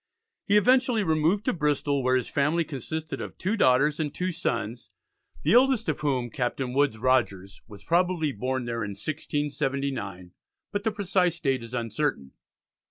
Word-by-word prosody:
He 205 - +5
eventually 250 +1 +3
removed 165 +5 +1
to 255 - +2
Bristol, 145 -3 0
where 130 0 +2
his 125 -2 0
family 150 +4 +1
consisted 155 +2 -5
of - - -7
two 195 +5 -1
daughters 145 - +3
and 150 -2 -1
two 180 +4 -2
sons, 120 -9 -3 0.5
the - - +3
eldest 250 -2 +4
of 155 - -1
whom, 130 -5 -1
Captain 125 +1 -2
Woodes 140 -4 +2
Rogers, 110 -6 0
was 100 -3 -12
probably 170 -3 +1
born 130 +2 -2
there 115 -1 -2
in 100 -1 -4
1679, 135 - -3 0.4
but 205 0 -2
the 220 - +2
precise 185 -4 0
date 135 -5 0
is 115 +2 -7
uncertain. 115 - -2
145 Hz, 160 wpm, -26 LUFS, 125-175 Hz, 0.5 s, He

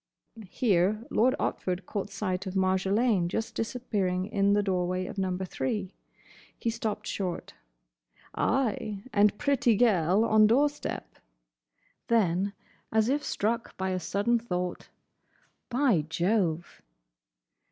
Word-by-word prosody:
Here 210 0 +1
Lord 255 +4 +3
Otford 180 0 -2
caught 205 +1 -4
sight 190 -2 -3
of 190 - -5
Marjolaine 190 +1 +2
just 225 +6 -3
disappearing 205 -6 -1
in 200 -1 +2
the 205 0 +3
doorway 185 -1 -1
of 195 - -6
Number 190 0 -1
Three. 200 -1 -3 0.6
He 230 - -1
stopped 215 -2 -3
short. 185 -5 -4 0.8
"Ay, 215 -5 -1
and 205 -1 +4
pretty 275 -6 +2
gel 195 -3 +3
on 215 -1 +5
door 275 +7 +4
step." 290 - -7 0.9
Then, 200 -3 +2 0.4
as 220 +1 +2
if 290 +2 +1
struck 230 0 -2
by 190 0 -1
a 185 - -1
sudden 205 +6 +1
thought, 180 -5 -4 0.8
"By 245 - +3
Jove!" 175 -1 0
205 Hz, 120 wpm, -28 LUFS, 185-230 Hz, 0.9 s, on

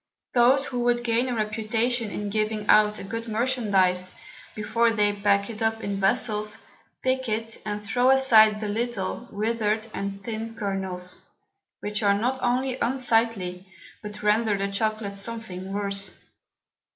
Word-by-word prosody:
Those 260 +3 +4
who 245 - -3
would 240 0 +1
gain 240 +2 +1
a 245 - -1
Reputation 225 +2 0
in 205 0 -4
giving 215 0 -1
out 210 0 +5
a - - -7
good 230 +3 -5
Merchandize, 205 -6 +1 0.4
before 220 +2 +1
they 210 -2 +2
pack 200 0 +2
it 225 -2 -8
up 225 0 0
in 200 -1 -2
Vessels, 210 +1 +1 0.5
pick 260 -1 0
it, 225 +1 -2
and 205 0 -2
throw 245 +5 +2
aside 225 -5 +6
the 215 - -3
little, 230 +1 -3
wither'd, 215 0 -1
and 195 0 -5
thin 225 +1 -5
Kernels, 190 -4 -3 0.6
which 210 +1 -2
are 200 -1 +4
not 250 +5 -1
only 255 +1 0
unsightly, 225 -7 0 0.3
but 210 0 -8
render 210 0 +2
the 200 0 -1
Chocolate 215 0 -1
something 195 -3 -5
worse. 200 0 -2
215 Hz, 145 wpm, -25 LUFS, 200-235 Hz, 0.6 s, aside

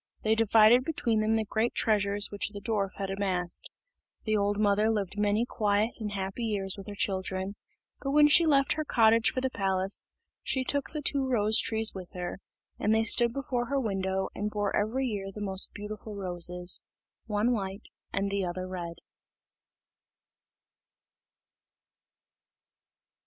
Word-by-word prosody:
They 220 - +3
divided 225 +2 +5
between 240 -7 0
them 215 +1 +2
the 220 -1 +1
great 220 +3 -1
treasures 205 -1 +2
which 205 0 -1
the 205 -1 -8
dwarf 200 -3 -2
had 195 -1 -4
amassed. 185 -3 -1 0.5
The 215 -1 0
old 205 0 +1
mother 210 +1 +3
lived 205 -3 -1
many 210 +2 +1
quiet 210 -1 +1
and 210 -2 -4
happy 195 +4 -4
years 200 -4 -2
with 195 0 -10
her 205 - -6
children; 190 0 -2 0.4
but 275 - -4
when 295 +1 +6
she 325 +3 +5
left 275 -3 +4
her 310 - -2
cottage 225 -4 +4
for 255 - -3
the 260 0 -1
palace, 195 -2 0 0.3
she 260 - 0
took 285 +1 -1
the 300 -1 -5
two 275 -1 +1
rose 220 -3 +3
trees 220 0 +3
with 185 -2 -9
her, 180 +1 -5 0.4
and 215 +1 +2
they 220 - +3
stood 235 +2 +4
before 245 -2 -2
her 275 +1 0
window 190 -4 -1
and 210 +1 -2
bore 205 -1 -1
every 235 +6 0
year 200 -5 -3
the 210 - -9
most 195 -2 -4
beautiful 210 +1 -7
roses 180 -2 -2 0.5
one 215 +2 +1
white 200 -2 -3 0.2
and 195 0 -1
the 200 -1 0
other 185 +1 -4
red. 175 -2 -5
210 Hz, 155 wpm, -29 LUFS, 195-230 Hz, 0.5 s, when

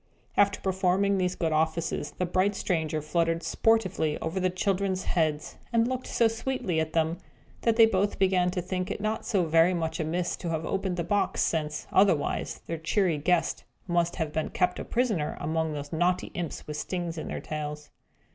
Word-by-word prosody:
After 200 -1 +3
performing 190 +1 +1
these 180 0 0
good 165 -2 -1
offices, 160 -1 -1
the 180 - 0
bright 185 +3 +1
stranger 160 -5 -1
fluttered 165 +1 0
sportively 190 -9 +1
over 160 +4 -2
the 185 0 +2
children's 190 0 0
heads, 155 -3 -1
and 230 0 +3
looked 255 0 -3
so 230 - +3
sweetly 225 -7 -1
at 160 0 -2
them, 165 +1 +1 0.4
that 230 -1 +2
they 225 -1 +8
both 205 -1 +1
began 185 -2 +3
to 180 -1 -2
think 185 0 -3
it - - -3
not 215 +1 -2
so 190 -4 +2
very 165 +3 +4
much 160 -2 -2
amiss 170 +2 -1
to 175 - -4
have 160 -1 -2
opened 190 -2 -1
the 170 - 0
box, 205 +4 0
since, 155 -2 -1
otherwise, 190 -7 +2
their 165 -1 -4
cheery 170 -1 +1
guest 175 +3 +1 0.2
must 175 -1 +1
have 160 -4 -3
been 160 - -1
kept 180 - 0
a - - -3
prisoner 220 -11 0
among 160 +1 -1
those 145 0 -6
naughty 175 +3 +1
imps 175 -3 -4
with 150 0 -5
stings 175 +1 -3
in 155 - -5
their - - -4
tails. 150 -1 -5
175 Hz, 185 wpm, -28 LUFS, 160-195 Hz, 0.4 s, they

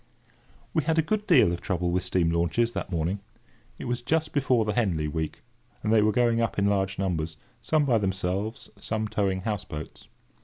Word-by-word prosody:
We 160 - +3
had 160 0 +1
a 160 - +4
good 210 +6 -1
deal 135 - +6
of 85 - -5
trouble 90 -2 -1
with 90 +1 +1
steam 90 -2 +1
launches 85 +8 +1
that - - -4
morning. 85 +4 -1 0.6
It - - -7
was 120 0 -2
just 155 +5 0
before 130 -5 +2
the 105 - 0
Henley 90 -10 +1
week, 80 +1 -4 0.4
and 110 - +2
they 110 - +6
were 105 +1 +3
going 115 0 +2
up 115 - -1
in 100 - +2
large 100 -1 +1
numbers; 80 -4 -2 0.2
some 155 -2 +2
by 120 -5 +3
themselves, 95 +2 -2
some 110 +1 -2
towing 95 -3 0
houseboats. 95 -7 -5
100 Hz, 190 wpm, -27 LUFS, 90-120 Hz, 0.6 s, deal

